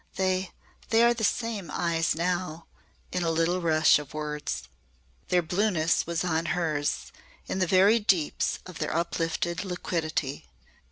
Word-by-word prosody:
They 185 Hz, -1 st, 0 dB, 0.4 s
they 225 Hz, +1 st, +5 dB
are 235 Hz, 0 st, +5 dB
the 230 Hz, -2 st, -5 dB
same 220 Hz, -6 st, -1 dB
eyes 165 Hz, +1 st, 0 dB
now," 170 Hz, -1 st, -2 dB, 0.5 s
in 180 Hz, -, -1 dB
a 170 Hz, -, +1 dB
little 165 Hz, +3 st, +1 dB
rush 160 Hz, -2 st, +5 dB
of 145 Hz, -1 st, -10 dB
words. 150 Hz, -, -3 dB, 0.6 s
Their 180 Hz, -1 st, +2 dB
blueness 175 Hz, -2 st, +1 dB
was 170 Hz, 0 st, -1 dB
on 165 Hz, -2 st, 0 dB
hers 155 Hz, -4 st, -1 dB, 0.3 s
in 190 Hz, -, -3 dB
the 185 Hz, -, +2 dB
very 195 Hz, +6 st, +5 dB
deeps 185 Hz, -7 st, +1 dB
of 185 Hz, -3 st, -9 dB
their 155 Hz, -1 st, -2 dB
uplifted 170 Hz, +1 st, -1 dB
liquidity. 160 Hz, -, -3 dB
170 Hz, 145 wpm, -27 LUFS, 160-185 Hz, 0.6 s, they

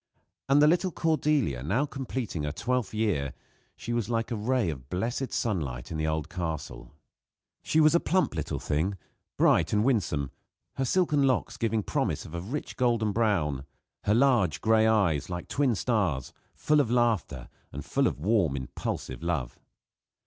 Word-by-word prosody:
And 145 Hz, +2 st, +6 dB
the -, -, +7 dB
little 180 Hz, +4 st, +3 dB
Cordelia, 150 Hz, -, +1 dB
now 105 Hz, -, +1 dB
completing 130 Hz, -, -4 dB
her 75 Hz, 0 st, -2 dB
twelfth 120 Hz, -, -1 dB
year 100 Hz, -, -1 dB, 0.4 s
she 120 Hz, -, -5 dB
was 120 Hz, -2 st, -1 dB
like 115 Hz, 0 st, -1 dB
a -, -, 0 dB
ray 115 Hz, -3 st, 0 dB
of 65 Hz, -3 st, -10 dB
blessed 120 Hz, +8 st, -2 dB
sunlight 75 Hz, -, -2 dB
in 80 Hz, -, -3 dB
the 80 Hz, -, 0 dB
old 80 Hz, 0 st, -1 dB
castle. 85 Hz, -3 st, -5 dB, 0.7 s
She 160 Hz, -, +1 dB
was 155 Hz, 0 st, +6 dB
a 170 Hz, -, +5 dB
plump 185 Hz, -, +1 dB
little 80 Hz, -4 st, -3 dB
thing, 90 Hz, +7 st, -1 dB, 0.4 s
bright 85 Hz, 0 st, +3 dB
and 105 Hz, 0 st, +3 dB
winsome, 80 Hz, -, 0 dB, 0.4 s
her 135 Hz, -, -1 dB
silken 150 Hz, 0 st, +2 dB
locks 120 Hz, -2 st, 0 dB
giving 115 Hz, -2 st, 0 dB
promise -, -, -1 dB
of 80 Hz, -, -11 dB
a 85 Hz, -, -3 dB
rich 125 Hz, +11 st, -5 dB
golden 115 Hz, -4 st, +2 dB
brown; 95 Hz, -, 0 dB, 0.4 s
her 105 Hz, -, +3 dB
large 120 Hz, -, +3 dB
gray 110 Hz, 0 st, +4 dB
eyes, 95 Hz, -10 st, +2 dB
like 90 Hz, -1 st, -5 dB
twin 135 Hz, -5 st, +1 dB
stars, 95 Hz, -, 0 dB, 0.2 s
full 150 Hz, 0 st, +2 dB
of 135 Hz, -6 st, +2 dB
laughter 115 Hz, -, 0 dB, 0.2 s
and -, -, -7 dB
full -, -, +1 dB
of -, -, -3 dB
warm, 90 Hz, -4 st, +2 dB
impulsive 65 Hz, -1 st, -5 dB
love. 80 Hz, -8 st, -2 dB
110 Hz, 165 wpm, -28 LUFS, 80-125 Hz, 0.7 s, the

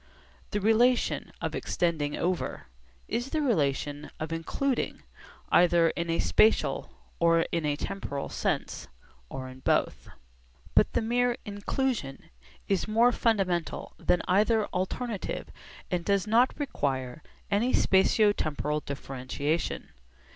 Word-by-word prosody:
The 205 Hz, -, -1 dB
relation 230 Hz, +4 st, +2 dB
of -, -, -2 dB
'extending 155 Hz, -4 st, -1 dB
over' 180 Hz, +1 st, -2 dB, 0.4 s
is 240 Hz, +4 st, -2 dB
the 315 Hz, -, -1 dB
relation 145 Hz, -, 0 dB
of 155 Hz, +1 st, -3 dB
'including,' 245 Hz, +11 st, -2 dB, 0.5 s
either 170 Hz, -1 st, +5 dB
in 170 Hz, 0 st, -4 dB
a 165 Hz, -, +1 dB
spatial 220 Hz, +1 st, +3 dB, 0.3 s
or 165 Hz, 0 st, +4 dB
in 165 Hz, -3 st, 0 dB
a 145 Hz, -, +1 dB
temporal 145 Hz, -4 st, -4 dB
sense, -, -, -2 dB, 0.4 s
or 130 Hz, -1 st, -6 dB
in 130 Hz, 0 st, -11 dB
both. -, -, 0 dB, 0.6 s
But -, -, +4 dB
the -, -, +1 dB
mere 245 Hz, +1 st, +1 dB
'inclusion' 205 Hz, -, -3 dB, 0.4 s
is 195 Hz, 0 st, 0 dB
more 230 Hz, +3 st, +4 dB
fundamental 195 Hz, -8 st, 0 dB
than 180 Hz, -, +1 dB
either 215 Hz, +3 st, +3 dB
alternative 200 Hz, +3 st, -3 dB, 0.4 s
and 175 Hz, -1 st, 0 dB
does 200 Hz, +1 st, +1 dB
not 230 Hz, +4 st, +3 dB
require 135 Hz, -, -2 dB, 0.3 s
any 230 Hz, +6 st, +2 dB
spatio 205 Hz, +2 st, +4 dB
temporal 150 Hz, 0 st, -1 dB
differentiation. 140 Hz, +2 st, -3 dB
180 Hz, 120 wpm, -28 LUFS, 150-225 Hz, 0.6 s, either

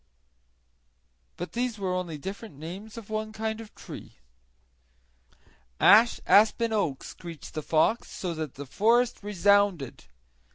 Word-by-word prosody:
But 175 Hz, -, -5 dB
all -, -, -32 dB
these 245 Hz, -3 st, -1 dB
were 190 Hz, -2 st, -2 dB
only 180 Hz, -4 st, -3 dB
different 195 Hz, +4 st, -7 dB
names 190 Hz, +9 st, -8 dB
of 220 Hz, -2 st, -9 dB
one 215 Hz, 0 st, -2 dB
kind 220 Hz, 0 st, -3 dB
of 220 Hz, -, -13 dB
tree. -, -, -10 dB, 1.6 s
"Ash, 225 Hz, +3 st, +6 dB
aspen, 220 Hz, +2 st, +4 dB
oak," 165 Hz, -11 st, 0 dB
screeched 170 Hz, -3 st, -9 dB
the 155 Hz, -, -3 dB
fox, 160 Hz, +10 st, +1 dB
so 180 Hz, -3 st, -4 dB
that 155 Hz, -4 st, -5 dB
the 145 Hz, -, -7 dB
forest 230 Hz, -, +2 dB
resounded. 200 Hz, -, +2 dB
200 Hz, 130 wpm, -27 LUFS, 170-220 Hz, 1.6 s, Ash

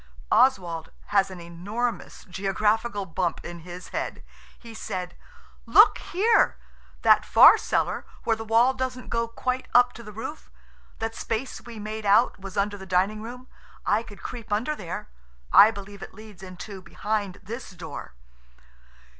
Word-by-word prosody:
Oswald 175 Hz, -11 st, +3 dB, 0.2 s
has 195 Hz, -1 st, +3 dB
an 185 Hz, -2 st, -9 dB
enormous 200 Hz, +8 st, -4 dB
geographical 205 Hz, +3 st, 0 dB
bump 170 Hz, 0 st, -2 dB
in 175 Hz, 0 st, -7 dB
his 175 Hz, +2 st, -9 dB
head. -, -, -4 dB, 0.3 s
He 230 Hz, -1 st, -12 dB
said– 185 Hz, -5 st, -5 dB, 0.5 s
"Look -, -, +7 dB
here! 435 Hz, +6 st, +2 dB, 0.5 s
That -, -, +6 dB
far -, -, +8 dB
cellar, -, -, -1 dB, 0.2 s
where 225 Hz, -, +2 dB
the 225 Hz, -, -6 dB
wall 230 Hz, +4 st, +4 dB
doesn't 255 Hz, -1 st, -4 dB
go 230 Hz, 0 st, 0 dB
quite 255 Hz, +2 st, -3 dB
up 245 Hz, 0 st, +6 dB
to -, -, -10 dB
the 215 Hz, -2 st, -10 dB
roof–that 225 Hz, -1 st, -8 dB
space 230 Hz, +3 st, -4 dB
we 235 Hz, -2 st, -10 dB
made 215 Hz, 0 st, -5 dB
out 210 Hz, +3 st, +4 dB
was 195 Hz, +1 st, -8 dB
under 205 Hz, 0 st, 0 dB
the 190 Hz, -, -10 dB
dining 195 Hz, +4 st, +1 dB
room–I 235 Hz, -2 st, -4 dB
could 205 Hz, -3 st, -13 dB
creep 235 Hz, -4 st, -7 dB
under 245 Hz, +9 st, 0 dB
there. 180 Hz, -, -6 dB, 0.5 s
I 210 Hz, -, +10 dB
believe 200 Hz, -2 st, -9 dB
it -, -, -9 dB
leads 215 Hz, -3 st, -13 dB
into 190 Hz, +1 st, -9 dB
behind 205 Hz, 0 st, -3 dB
this 235 Hz, +3 st, -7 dB
door." 175 Hz, -, -9 dB
210 Hz, 145 wpm, -26 LUFS, 190-230 Hz, 0.5 s, I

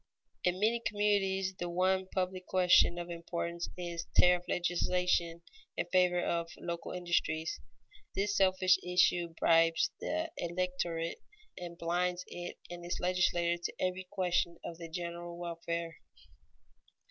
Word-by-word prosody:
In 180 Hz, +1 st, +1 dB
many 225 Hz, +3 st, +2 dB
communities, 195 Hz, -2 st, +1 dB
the 175 Hz, -, -2 dB
one 185 Hz, +2 st, +1 dB
public 185 Hz, -1 st, -2 dB
question 180 Hz, -1 st, +5 dB
of 175 Hz, 0 st, -5 dB
importance 170 Hz, 0 st, -4 dB
is 170 Hz, -1 st, -4 dB
tariff 180 Hz, 0 st, +5 dB
legislation 175 Hz, -1 st, +1 dB, 0.3 s
in -, -, 0 dB
favor 180 Hz, -1 st, +4 dB
of 170 Hz, -1 st, -1 dB
the -, -, -15 dB
local 170 Hz, -1 st, -4 dB
industries. 165 Hz, -, -1 dB, 0.6 s
This 205 Hz, +1 st, 0 dB
selfish 185 Hz, -1 st, +4 dB
issue 175 Hz, -1 st, +2 dB
bribes 165 Hz, 0 st, +4 dB
the 320 Hz, +1 st, -2 dB
electorate, 175 Hz, -1 st, -2 dB, 0.3 s
and 175 Hz, -1 st, -7 dB
blinds 175 Hz, +1 st, 0 dB
it 175 Hz, 0 st, -7 dB
and 175 Hz, 0 st, -7 dB
its 175 Hz, -, -3 dB
legislator 175 Hz, -1 st, +1 dB
to -, -, -2 dB
every 185 Hz, 0 st, -1 dB
question 180 Hz, -3 st, 0 dB
of 165 Hz, -1 st, -6 dB
the 165 Hz, -1 st, -7 dB
general 170 Hz, 0 st, -5 dB
welfare. 170 Hz, -1 st, -4 dB
175 Hz, 130 wpm, -32 LUFS, 170-185 Hz, 0.6 s, question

